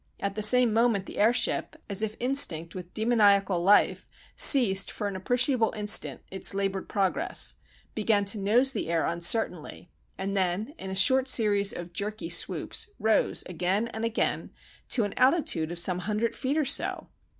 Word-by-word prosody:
At 200 Hz, 0 st, -4 dB
the 215 Hz, -, -5 dB
same 240 Hz, +1 st, +5 dB
moment 225 Hz, -4 st, +1 dB
the -, -, -9 dB
airship, 230 Hz, +4 st, 0 dB
as 200 Hz, 0 st, -1 dB
if 220 Hz, 0 st, -3 dB
instinct 185 Hz, -, +2 dB
with 180 Hz, -1 st, -10 dB
demoniacal 205 Hz, -5 st, +1 dB
life, 200 Hz, +4 st, +2 dB, 0.3 s
ceased 200 Hz, -9 st, +5 dB
for 205 Hz, -, -5 dB
an 200 Hz, -, -6 dB
appreciable 245 Hz, +4 st, 0 dB
instant 210 Hz, +1 st, +3 dB
its 190 Hz, +1 st, 0 dB
laboured 195 Hz, -1 st, -3 dB
progress, 200 Hz, -, -1 dB, 0.4 s
began 210 Hz, -2 st, 0 dB
to 200 Hz, +2 st, -1 dB
nose 240 Hz, +7 st, +2 dB
the -, -, -4 dB
air 165 Hz, -1 st, 0 dB
uncertainly, 170 Hz, -1 st, -1 dB, 0.3 s
and 195 Hz, +1 st, -4 dB
then 190 Hz, +7 st, -2 dB
in 190 Hz, -, -7 dB
a 190 Hz, -, -5 dB
short 260 Hz, +7 st, +3 dB
series 205 Hz, -5 st, +2 dB
of 175 Hz, 0 st, -8 dB
jerky 215 Hz, -, -5 dB
swoops 450 Hz, -, -1 dB
rose, 220 Hz, 0 st, 0 dB
again 185 Hz, +6 st, -2 dB
and 220 Hz, -1 st, -7 dB
again, 230 Hz, 0 st, -2 dB, 0.4 s
to 235 Hz, -, +2 dB
an 205 Hz, -, -4 dB
altitude 255 Hz, -, +1 dB
of 175 Hz, -, -7 dB
some 180 Hz, +1 st, 0 dB
hundred 210 Hz, +5 st, -3 dB
feet 270 Hz, +4 st, -3 dB
or 310 Hz, -, 0 dB
so. 270 Hz, -, -1 dB
205 Hz, 165 wpm, -26 LUFS, 190-235 Hz, 0.4 s, same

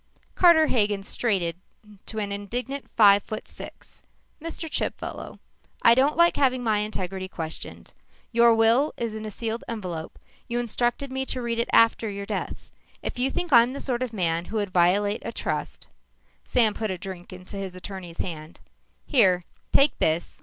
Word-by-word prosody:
Carter 340 Hz, -3 st, +6 dB
Hagen 205 Hz, -7 st, +1 dB
straightened 185 Hz, -6 st, -1 dB, 0.5 s
to 220 Hz, -, -6 dB
an 205 Hz, -2 st, -2 dB
indignant 245 Hz, +7 st, -4 dB
five 205 Hz, -2 st, +7 dB
foot 215 Hz, -, -7 dB
six. -, -, -11 dB, 0.4 s
"Mr. 330 Hz, +1 st, -5 dB
Chipfellow, -, -, -4 dB, 0.5 s
I 230 Hz, -, +8 dB
don't 270 Hz, +5 st, +2 dB
like 340 Hz, 0 st, +5 dB
having 255 Hz, -3 st, +2 dB
my 215 Hz, -3 st, +2 dB
integrity 190 Hz, -3 st, -4 dB
questioned. 160 Hz, -4 st, -7 dB, 0.4 s
Your 235 Hz, -1 st, +5 dB
will 230 Hz, +6 st, +3 dB
was 230 Hz, -2 st, -3 dB
in 220 Hz, 0 st, -6 dB
a -, -, -4 dB
sealed 225 Hz, +2 st, -4 dB
envelope. 180 Hz, -8 st, -5 dB, 0.3 s
You 240 Hz, -, -2 dB
instructed 240 Hz, +3 st, -1 dB
me 265 Hz, 0 st, -2 dB
to 255 Hz, -, -3 dB
read 235 Hz, -1 st, -1 dB
it 235 Hz, -, -1 dB
after 230 Hz, -1 st, +4 dB
your 200 Hz, 0 st, -5 dB
death. -, -, -5 dB, 0.3 s
If -, -, -4 dB
you 260 Hz, +2 st, +2 dB
think 345 Hz, +1 st, -2 dB
I'm 240 Hz, +1 st, +6 dB
the 280 Hz, -, -5 dB
sort 245 Hz, -2 st, -2 dB
of 255 Hz, -3 st, -2 dB
man 170 Hz, -5 st, -1 dB
who 220 Hz, -, -7 dB
would 205 Hz, -3 st, -2 dB
violate 195 Hz, +4 st, +2 dB
a 230 Hz, -, -4 dB
trust -, -, -4 dB, 0.3 s
" -, -, -40 dB
Sam 225 Hz, -4 st, +4 dB
put 220 Hz, 0 st, -3 dB
a 185 Hz, -, -3 dB
drink 185 Hz, -1 st, -8 dB
into 185 Hz, +2 st, -8 dB
his 190 Hz, -2 st, -5 dB
attorney's 185 Hz, -2 st, -8 dB
hand. 160 Hz, -2 st, -7 dB, 0.5 s
"Here, 185 Hz, -, +3 dB, 0.3 s
take 280 Hz, +2 st, +4 dB
this. 160 Hz, +2 st, 0 dB
220 Hz, 175 wpm, -25 LUFS, 190-245 Hz, 0.5 s, I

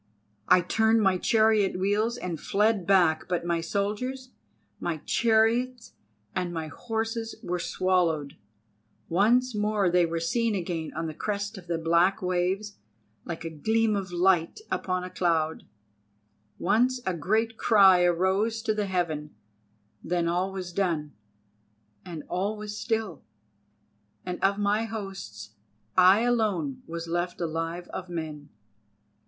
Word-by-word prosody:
I 180 Hz, 0 st, +6 dB
turned 220 Hz, +4 st, +2 dB
my 190 Hz, -2 st, +3 dB
chariot 215 Hz, -3 st, +3 dB
wheels, 210 Hz, +5 st, 0 dB
and 175 Hz, -7 st, -5 dB
fled 205 Hz, -3 st, +1 dB
back, 175 Hz, -5 st, +3 dB
but 175 Hz, -1 st, -1 dB
my 170 Hz, -1 st, 0 dB
soldiers, 215 Hz, +9 st, -3 dB, 0.5 s
my 170 Hz, -2 st, -2 dB
chariots, 235 Hz, +2 st, +1 dB, 0.4 s
and 180 Hz, -1 st, -1 dB
my 160 Hz, -2 st, -4 dB
horses 225 Hz, +4 st, -3 dB
were 180 Hz, 0 st, -2 dB
swallowed; 170 Hz, -6 st, 0 dB, 0.7 s
once 235 Hz, +8 st, +3 dB
more 210 Hz, -3 st, +1 dB
they 175 Hz, -1 st, +4 dB
were 165 Hz, 0 st, -2 dB
seen 230 Hz, +6 st, 0 dB
again 170 Hz, -4 st, -3 dB
on 165 Hz, +1 st, -2 dB
the 160 Hz, -, -4 dB
crest 205 Hz, +4 st, -3 dB
of 185 Hz, -3 st, -11 dB
the 170 Hz, -1 st, -1 dB
black 170 Hz, +4 st, +3 dB
waves 185 Hz, +3 st, -1 dB, 0.5 s
like 170 Hz, 0 st, -6 dB
a 165 Hz, -, -4 dB
gleam 220 Hz, +7 st, +1 dB
of 190 Hz, -2 st, -3 dB
light 175 Hz, -, +2 dB
upon 185 Hz, -1 st, -1 dB
a 180 Hz, -, -6 dB
cloud, 165 Hz, -3 st, 0 dB, 0.9 s
once 245 Hz, +7 st, +2 dB
a 185 Hz, -, 0 dB
great 220 Hz, +8 st, 0 dB
cry 195 Hz, -5 st, +6 dB
arose 190 Hz, +6 st, +1 dB
to 215 Hz, -, +1 dB
the 210 Hz, -1 st, -2 dB
heaven; 160 Hz, -5 st, -2 dB, 0.7 s
then 170 Hz, 0 st, 0 dB
all 180 Hz, +3 st, 0 dB
was 185 Hz, -2 st, -6 dB
done 165 Hz, -6 st, -1 dB, 0.9 s
and 165 Hz, -4 st, -7 dB
all 200 Hz, +4 st, -2 dB
was 210 Hz, 0 st, -6 dB
still, 220 Hz, -5 st, -2 dB, 1.0 s
and 180 Hz, -1 st, -5 dB
of 200 Hz, +1 st, +3 dB
my 210 Hz, +2 st, +1 dB
hosts 195 Hz, -, -7 dB, 0.4 s
I 185 Hz, +3 st, +6 dB
alone 210 Hz, -, 0 dB
was 170 Hz, 0 st, -5 dB
left 175 Hz, +1 st, -2 dB
alive 165 Hz, +1 st, -3 dB
of 185 Hz, -1 st, -6 dB
men." 155 Hz, -4 st, -6 dB
185 Hz, 135 wpm, -27 LUFS, 170-215 Hz, 1.0 s, I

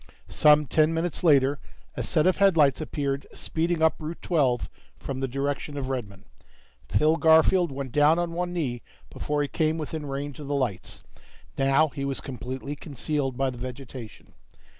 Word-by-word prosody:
Some 150 Hz, 0 st, +5 dB
ten 155 Hz, +4 st, +2 dB
minutes 165 Hz, +1 st, -2 dB
later, 140 Hz, -3 st, +4 dB, 0.3 s
a -, -, -4 dB
set 155 Hz, -2 st, +1 dB
of 185 Hz, -, +3 dB
headlights 165 Hz, -9 st, +4 dB
appeared 140 Hz, -2 st, -3 dB
speeding 165 Hz, 0 st, -1 dB
up 160 Hz, -, +3 dB
Route 160 Hz, +2 st, -6 dB
Twelve 135 Hz, -, +1 dB, 0.3 s
from 135 Hz, -1 st, -5 dB
the 135 Hz, -, -1 dB
direction 140 Hz, +2 st, -3 dB
of 135 Hz, -2 st, -3 dB
Redmon. 100 Hz, -7 st, -5 dB, 0.7 s
Phil 155 Hz, -, +3 dB
Garfield 160 Hz, +2 st, +4 dB
went 135 Hz, -1 st, -5 dB
down 150 Hz, +4 st, +4 dB
on 175 Hz, -1 st, -1 dB
one 175 Hz, +1 st, -2 dB
knee 135 Hz, -9 st, -2 dB, 0.3 s
before 150 Hz, 0 st, -2 dB
he -, -, -2 dB
came 155 Hz, +2 st, 0 dB
within 155 Hz, -1 st, -5 dB
range 140 Hz, +1 st, -5 dB
of 145 Hz, -, -7 dB
the 145 Hz, -, -1 dB
lights. 125 Hz, -9 st, -3 dB, 0.5 s
Now 135 Hz, +3 st, +3 dB
he 140 Hz, 0 st, -6 dB
was 140 Hz, -1 st, -2 dB
completely 130 Hz, +2 st, -6 dB
concealed 140 Hz, -2 st, -3 dB
by 135 Hz, -1 st, 0 dB
the 120 Hz, -, -10 dB
vegetation. 125 Hz, -2 st, -9 dB
145 Hz, 165 wpm, -26 LUFS, 135-160 Hz, 0.7 s, Some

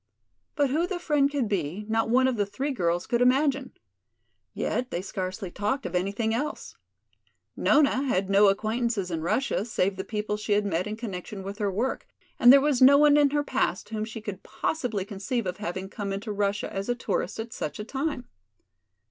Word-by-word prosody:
But 285 Hz, -3 st, +2 dB
who 325 Hz, +5 st, +1 dB
the 370 Hz, -1 st, -3 dB
friend 295 Hz, -5 st, +2 dB
could 280 Hz, -5 st, -1 dB
be, 190 Hz, 0 st, -2 dB
not 225 Hz, 0 st, 0 dB
one 260 Hz, +2 st, +4 dB
of 260 Hz, -, 0 dB
the 205 Hz, -2 st, +1 dB
three 265 Hz, +9 st, -3 dB
girls 175 Hz, -7 st, 0 dB
could 240 Hz, 0 st, 0 dB
imagine. 270 Hz, +1 st, +2 dB, 0.8 s
Yet 255 Hz, 0 st, -2 dB
they 175 Hz, -, -2 dB
scarcely 185 Hz, 0 st, -4 dB
talked 210 Hz, +8 st, -2 dB
of 180 Hz, -, -4 dB
anything 200 Hz, +5 st, 0 dB
else. 290 Hz, +6 st, -4 dB, 0.8 s
Nona 280 Hz, -3 st, +3 dB
had 195 Hz, -7 st, 0 dB
no 200 Hz, +1 st, +5 dB
acquaintances 215 Hz, -1 st, 0 dB
in 165 Hz, -1 st, -2 dB
Russia 200 Hz, +6 st, 0 dB
save 195 Hz, -4 st, -1 dB
the 190 Hz, -, -3 dB
people 210 Hz, 0 st, -3 dB
she 210 Hz, 0 st, -1 dB
had 205 Hz, 0 st, +2 dB
met 185 Hz, -1 st, -1 dB
in 210 Hz, -, -4 dB
connection 200 Hz, -3 st, -6 dB
with 200 Hz, +3 st, -7 dB
her 205 Hz, -2 st, 0 dB
work, 230 Hz, +8 st, -2 dB, 0.3 s
and 245 Hz, -, +9 dB
there 280 Hz, -, +9 dB
was 275 Hz, -2 st, +1 dB
no 275 Hz, +2 st, +8 dB
one 295 Hz, 0 st, +6 dB
in 290 Hz, -1 st, +5 dB
her 290 Hz, +1 st, 0 dB
past 260 Hz, -11 st, -1 dB
whom 215 Hz, -1 st, -3 dB
she 220 Hz, 0 st, -6 dB
could 205 Hz, -3 st, -6 dB
possibly 235 Hz, -11 st, -2 dB
conceive 215 Hz, +3 st, -3 dB
of 180 Hz, 0 st, -3 dB
having 190 Hz, -2 st, -4 dB
come 200 Hz, 0 st, -5 dB
into 200 Hz, +3 st, -4 dB
Russia 205 Hz, 0 st, -1 dB
as 195 Hz, +3 st, -4 dB
a 245 Hz, -, +1 dB
tourist 235 Hz, -, -2 dB
at 225 Hz, 0 st, -5 dB
such 150 Hz, -, -4 dB
a 210 Hz, -, -5 dB
time. 270 Hz, +2 st, -3 dB
215 Hz, 200 wpm, -27 LUFS, 195-260 Hz, 0.8 s, and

